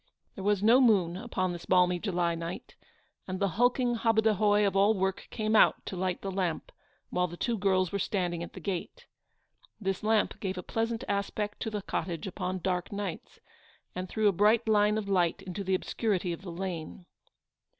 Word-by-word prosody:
There 190 Hz, -, -8 dB
was 205 Hz, 0 st, +1 dB
no 235 Hz, +5 st, +6 dB
moon 195 Hz, -8 st, +4 dB
upon 185 Hz, -4 st, -2 dB
this 175 Hz, -, -9 dB
balmy 180 Hz, -1 st, +4 dB
July 175 Hz, -3 st, 0 dB
night, 165 Hz, +1 st, -6 dB, 0.5 s
and 185 Hz, 0 st, -4 dB
the 200 Hz, -1 st, +1 dB
hulking 245 Hz, +4 st, +2 dB
hobadahoy 215 Hz, -2 st, +3 dB
of 195 Hz, -1 st, 0 dB
all 200 Hz, +3 st, +4 dB
work 190 Hz, 0 st, -2 dB
came 215 Hz, -1 st, -1 dB
out -, -, +4 dB
to -, -, -5 dB
light 185 Hz, 0 st, -2 dB
the 195 Hz, -, -3 dB
lamp 185 Hz, -4 st, -2 dB, 0.4 s
while 180 Hz, 0 st, +1 dB
the 175 Hz, 0 st, -9 dB
two 235 Hz, +4 st, 0 dB
girls 190 Hz, -3 st, +1 dB
were 200 Hz, -, -1 dB
standing 175 Hz, -3 st, -1 dB
at 170 Hz, -, -7 dB
the -, -, -8 dB
gate. 185 Hz, -4 st, -5 dB, 0.7 s
This 195 Hz, -3 st, -2 dB
lamp 215 Hz, 0 st, +1 dB
gave 190 Hz, -2 st, -3 dB
a 180 Hz, -, -5 dB
pleasant 230 Hz, +1 st, -2 dB
aspect 205 Hz, +1 st, -2 dB
to -, -, -2 dB
the 210 Hz, -2 st, -4 dB
cottage 170 Hz, -4 st, -3 dB
upon 185 Hz, -1 st, -4 dB
dark 180 Hz, -2 st, -1 dB
nights, 200 Hz, -4 st, -5 dB, 0.5 s
and 185 Hz, 0 st, -5 dB
threw 215 Hz, -1 st, +1 dB
a -, -, +6 dB
bright 215 Hz, +5 st, +3 dB
line 210 Hz, 0 st, +3 dB
of 215 Hz, -2 st, -3 dB
light 180 Hz, -4 st, +1 dB
into 190 Hz, +2 st, -5 dB
the 190 Hz, 0 st, +1 dB
obscurity 185 Hz, -2 st, -1 dB
of 170 Hz, -, -8 dB
the 185 Hz, -2 st, -7 dB
lane. 175 Hz, -1 st, -5 dB
195 Hz, 190 wpm, -29 LUFS, 180-215 Hz, 0.7 s, no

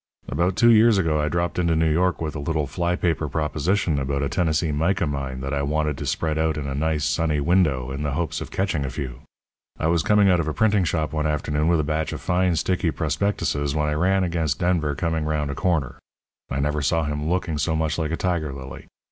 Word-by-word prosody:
"About 90 Hz, +2 st, 0 dB
two 120 Hz, +3 st, +5 dB
years 110 Hz, -1 st, +6 dB
ago 80 Hz, -5 st, +1 dB
I 75 Hz, -, 0 dB
dropped 85 Hz, +1 st, -1 dB
into 85 Hz, -2 st, +2 dB
New 80 Hz, 0 st, +2 dB
York 90 Hz, +2 st, +1 dB
with 80 Hz, -2 st, -3 dB
a -, -, -3 dB
little 75 Hz, +1 st, -1 dB
fly 85 Hz, +5 st, -1 dB
paper 80 Hz, -4 st, -1 dB
proposition 80 Hz, +2 st, 0 dB
about 70 Hz, +1 st, -1 dB
a 70 Hz, -, -1 dB
Tennessee 80 Hz, -2 st, 0 dB
mica 85 Hz, +5 st, +1 dB
mine 70 Hz, -3 st, -4 dB
that 70 Hz, +1 st, -3 dB
I 70 Hz, -, 0 dB
wanted 75 Hz, +1 st, 0 dB
to -, -, -4 dB
spread 80 Hz, -1 st, -1 dB
out 80 Hz, -1 st, +1 dB
in 75 Hz, -, -4 dB
a 70 Hz, -, -3 dB
nice, 75 Hz, +1 st, 0 dB
sunny 80 Hz, -2 st, +1 dB
window, 70 Hz, -6 st, +1 dB
in 70 Hz, +2 st, -4 dB
the 75 Hz, -2 st, -2 dB
hopes 85 Hz, +2 st, -2 dB
of -, -, -6 dB
catching 95 Hz, -7 st, -1 dB
a 65 Hz, -, -3 dB
few. 65 Hz, -1 st, -6 dB, 0.6 s
I -, -, -1 dB
was 85 Hz, 0 st, +3 dB
coming 105 Hz, 0 st, +4 dB
out 90 Hz, -2 st, +4 dB
of 80 Hz, -, -1 dB
a 75 Hz, -, -2 dB
printing 105 Hz, -4 st, +3 dB
shop 80 Hz, -1 st, -1 dB
one 75 Hz, 0 st, 0 dB
afternoon 75 Hz, 0 st, 0 dB
with 85 Hz, -1 st, +3 dB
a -, -, -3 dB
batch 80 Hz, +1 st, -2 dB
of -, -, -5 dB
fine, 90 Hz, 0 st, +1 dB
sticky 85 Hz, +2 st, 0 dB
prospectuses 75 Hz, -3 st, -1 dB
when 75 Hz, 0 st, +1 dB
I -, -, 0 dB
ran 95 Hz, +5 st, +2 dB
against 80 Hz, -6 st, -1 dB
Denver 85 Hz, -5 st, 0 dB
coming 80 Hz, -1 st, -1 dB
round 75 Hz, -2 st, -1 dB
a -, -, -3 dB
corner. 85 Hz, -9 st, -1 dB, 0.5 s
I 70 Hz, -, -2 dB
never 75 Hz, +1 st, 0 dB
saw 80 Hz, +4 st, +1 dB
him 75 Hz, +1 st, -2 dB
looking 85 Hz, -3 st, -1 dB
so 80 Hz, +2 st, 0 dB
much 80 Hz, 0 st, -1 dB
like 80 Hz, -2 st, -1 dB
a 80 Hz, -, -2 dB
tiger 85 Hz, -5 st, -1 dB
lily. 65 Hz, 0 st, -9 dB
80 Hz, 235 wpm, -23 LUFS, 75-85 Hz, 0.6 s, years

